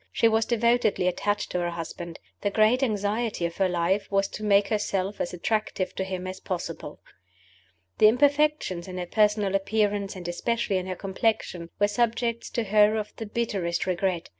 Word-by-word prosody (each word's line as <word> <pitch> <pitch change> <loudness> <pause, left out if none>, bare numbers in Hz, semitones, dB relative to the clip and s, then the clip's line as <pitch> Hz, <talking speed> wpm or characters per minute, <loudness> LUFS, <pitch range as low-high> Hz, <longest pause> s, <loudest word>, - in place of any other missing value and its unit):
She 230 - +3
was 225 0 +2
devotedly 235 -5 +2
attached 205 +3 -1
to 180 - -1
her 175 0 -1
husband; 170 0 -6 0.2
the 205 - +1
great 215 +5 +3
anxiety 215 -4 0
of 170 0 -4
her 190 -1 +2
life 180 +3 0
was 195 0 +2
to 215 - -7
make 200 -1 +4
herself 200 -2 -1
as - - -2
attractive 195 +1 -1
to 190 - -2
him 185 -1 -4
as 185 0 -6
possible. 170 -5 -5 1.0
The - - +8
imperfections 285 - +2
in 185 -1 -6
her 180 - -3
personal 210 0 +2
appearance 200 0 0
and 180 -2 -7
especially 205 +3 -1
in 185 0 -3
her 185 - -3
complexion 190 -3 -1
were 205 - +3
subjects 235 +1 0
to 235 - -1
her 210 +1 +4
of 215 -1 -4
the 225 - -5
bitterest 200 -6 -1
regret. 180 -1 -1
200 Hz, 175 wpm, -26 LUFS, 185-220 Hz, 1.0 s, The